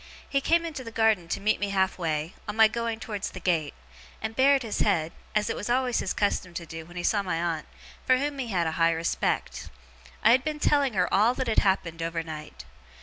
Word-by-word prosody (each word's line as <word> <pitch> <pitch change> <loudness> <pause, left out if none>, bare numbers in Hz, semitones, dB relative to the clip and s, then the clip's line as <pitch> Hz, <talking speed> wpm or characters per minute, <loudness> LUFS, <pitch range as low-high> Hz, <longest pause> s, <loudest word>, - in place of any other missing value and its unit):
He 275 -1 0
came 335 +3 +2
into 300 -5 -5
the 230 - -7
garden 220 -6 +2
to - - -2
meet 215 +2 +1
me 205 - -1
half 190 -1 0
way, 160 0 -2
on 210 - -4
my 220 0 +7
going 230 0 -3
towards 210 -3 -4
the - - -9
gate; 160 -5 0 0.4
and 220 +1 -4
bared 270 +1 +4
his 220 -3 -3
head, 160 -1 +1 0.2
as 210 0 +2
it - - -1
was 210 - -5
always 250 0 +1
his - - -2
custom 185 -3 -1
to 170 - -4
do 165 0 -8
when 175 +1 -11
he 175 - -3
saw 205 +2 +2
my 180 -4 -2
aunt, 165 -2 -2 0.4
for 255 - +4
whom 285 +1 -2
he 255 - -2
had 180 -6 0
a 160 - 0
high 165 0 +5
respect. 165 +1 -2 0.5
I 220 - +7
had 255 +2 +4
been 305 -1 -3
telling 280 -6 +2
her 180 -1 +2
all 220 +6 +4
that 260 - -2
had 225 - +3
happened 170 -4 0
overnight. 160 - -5
205 Hz, 230 wpm, -27 LUFS, 170-240 Hz, 0.5 s, my